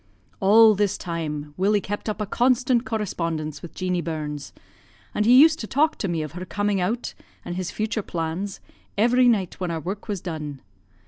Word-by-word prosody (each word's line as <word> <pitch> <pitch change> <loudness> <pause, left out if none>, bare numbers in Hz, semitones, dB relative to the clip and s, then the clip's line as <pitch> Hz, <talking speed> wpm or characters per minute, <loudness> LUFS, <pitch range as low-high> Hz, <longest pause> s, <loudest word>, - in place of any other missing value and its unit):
"All 215 +3 +7
this 205 0 0
time 150 -4 -4
Willie 205 +2 +3
kept 205 +2 -4
up 210 - -3
a 210 - -1
constant 250 +1 +2
correspondence 165 -9 -3
with 175 - -10
Jeanie 180 -1 -1
Burns, 150 -3 -5 0.6
and 210 - +1
he 250 +2 +8
used 315 +2 +6
to 220 - -5
talk 305 +7 +2
to 200 - -1
me 165 -3 -1
of 155 - -6
her 180 +3 -6
coming 205 +1 -1
out, 225 +7 -2 0.3
and 175 - -4
his 185 -1 -3
future 220 +2 -2
plans, 175 +3 -4 0.4
every 245 +4 +4
night 200 -7 +1
when 180 -2 -2
our 165 -1 -2
work 195 +7 -5
was 205 -3 -2
done. 150 -6 -6
195 Hz, 185 wpm, -24 LUFS, 165-220 Hz, 0.6 s, he